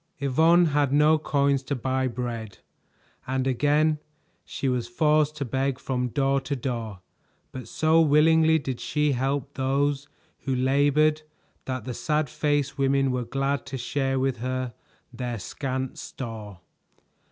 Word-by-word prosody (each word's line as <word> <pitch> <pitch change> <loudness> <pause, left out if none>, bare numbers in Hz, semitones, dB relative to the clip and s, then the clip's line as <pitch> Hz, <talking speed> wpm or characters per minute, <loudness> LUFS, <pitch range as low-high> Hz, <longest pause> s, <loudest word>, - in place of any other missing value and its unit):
Yvonne 160 +6 +4
had 145 -2 +2
no 150 +2 +4
coins 140 -2 +1
to 140 +1 -3
buy 130 +1 -1
bread, 115 -4 -5 0.7
and 130 0 -1
again 150 +4 +2 0.4
she 135 - -4
was 125 -2 0
forced 150 +4 +2
to 145 -2 -3
beg 135 +1 -1
from 125 -2 -2
door 135 +2 +1
to 140 - -3
door, 115 -7 -4 0.5
but 130 - -8
so 160 +1 +3
willingly 160 +1 +5
did 135 -5 -4
she 150 0 0
help 135 +2 -1
those 140 +1 0 0.3
who 135 -1 -2
labored 145 +4 +3 0.4
that 130 -1 -4
the 125 - -4
sad 150 +2 -1
faced 145 -2 -1
women 135 0 +2
were 125 -1 -1
glad 135 +3 -1
to 135 -1 -6
share 135 +1 -1
with 130 -1 0
her 130 0 -3 0.4
their 120 -1 -4
scant 130 +6 -4
store. 110 -7 -8
135 Hz, 140 wpm, -26 LUFS, 130-145 Hz, 0.7 s, willingly